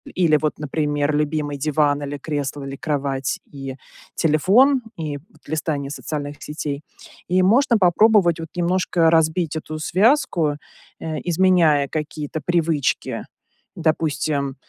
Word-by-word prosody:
или 165 -4 +4
вот, 155 -1 0
например, 145 0 -1
любимый 150 -1 -1
диван, 145 0 +1
или 145 0 -4
кресло, 145 -1 -4
или 135 0 -6
кровать 140 -2 -2
и 135 -2 -8 0.4
телефон, 205 - +4 0.2
и 150 -3 -4
вот 175 +12 -21
листание 145 -2 -2
социальных 145 -1 -5
сетей. 150 -1 -4 0.5
И 185 +1 +2
можно 235 +5 +4
попробовать, 185 -2 +4
вот, 165 - -5
немножко 175 -1 +2
разбить 160 0 +2
эту 155 0 -6
связку, 175 - +2 0.4
э, 160 -1 -4
изменяя 170 -5 +3
какие-то 150 0 -4
привычки. 165 -5 0 0.5
Допустим, 150 -3 -1
155 Hz, 120 wpm, -21 LUFS, 145-175 Hz, 0.5 s, или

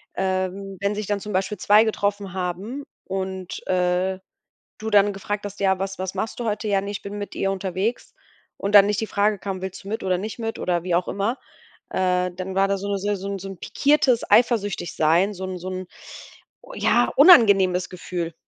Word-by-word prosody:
Ähm. 190 +1 -2
Wenn 200 +2 -1
sich 210 -1 -3
dann 205 0 -1
zum 210 +1 -7
Beispiel 190 +1 -1
2 210 +2 +6
getroffen 205 -3 -2
haben 190 +9 -4 0.2
und, 190 -1 -5
äh, 180 +1 +1 0.6
du 220 0 -4
dann 205 0 +5
gefragt 205 +1 -4
hast: 205 0 -7
„Ja, 190 -1 +2
was 195 0 -3
was 185 0 -4
machst 215 +5 -4
du 240 - -3
heute?“ 215 0 -2
„Ja, 200 -1 +2
ne, 200 +1 -5
ich 205 - -5
bin 205 +1 -7
mit 205 - -6
ihr 195 - -1
unterwegs“ 195 +4 -3 0.4
und 200 +1 -1
dann 200 -1 +9
nicht 210 +1 0
die 220 - -2
Frage 205 0 +1
kam: 190 -1 -5
„Willst 190 +1 -6
du 195 - -12
mit 220 +2 -3
oder 185 -1 +1
nicht 215 +4 -5
mit“ 225 -1 -4
oder 175 -2 0
wie 180 -1 -2
auch 175 +1 +1
immer, 210 +6 -2 0.5
äh, 180 -1 +1
dann 185 +1 -6
war 195 +1 +3
da 200 - 0
so 200 +1 -5
'ne 200 -1 -1
se 205 +1 -1
so 195 +1 -6 0.2
'n 195 - -8
pikiertes 275 -4 +2
Eifersüchtig 205 -5 +2
sein, 170 +6 +3
so 190 -1 -8
'n 185 -1 -5
so 180 +2 -6
'n 185 -1 -5 0.9
ja, 240 0 +2
unangenehmes 200 - +6
Gefühl. 175 -2 -5
195 Hz, 205 wpm, -23 LUFS, 185-205 Hz, 0.9 s, dann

